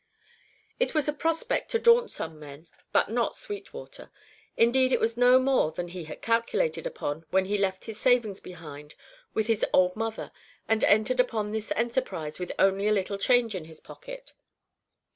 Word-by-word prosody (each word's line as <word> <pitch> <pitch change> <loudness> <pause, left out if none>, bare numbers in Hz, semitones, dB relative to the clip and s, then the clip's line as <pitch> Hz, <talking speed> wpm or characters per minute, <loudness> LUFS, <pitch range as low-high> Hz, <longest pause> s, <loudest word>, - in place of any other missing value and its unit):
It - - 0
was 305 -2 +2
a 295 - +1
prospect 330 +10 -1
to 460 - +2
daunt 470 +1 +5
some 160 -1 -7
men, 150 +2 -12 0.2
but - - +2
not 235 0 0
Sweetwater. 410 -1 -9 0.5
Indeed 255 +3 +4
it - - +3
was 225 +1 +1
no 245 +1 +6
more 260 -11 +2
than 175 +2 -5
he 175 -2 -7
had 155 - -10
calculated 230 - 0
upon 160 - -4
when 190 +2 +2
he 205 +2 -1
left 195 -2 -1
his 220 -1 -8
savings 235 -6 +2
behind 150 -4 -11 0.4
with 220 - +1
his 225 -1 0
old 180 0 +3
mother 225 0 -4 0.4
and 225 -1 +1
entered 220 +5 +3
upon 220 -4 +1
this 220 0 -4
enterprise 230 - -2
with 180 - -4
only 195 +1 +3
a - - +3
little 200 -1 -1
change 245 -1 +3
in 180 -5 -5
his 160 -1 -14
pocket. - - -11
220 Hz, 175 wpm, -27 LUFS, 185-255 Hz, 0.5 s, no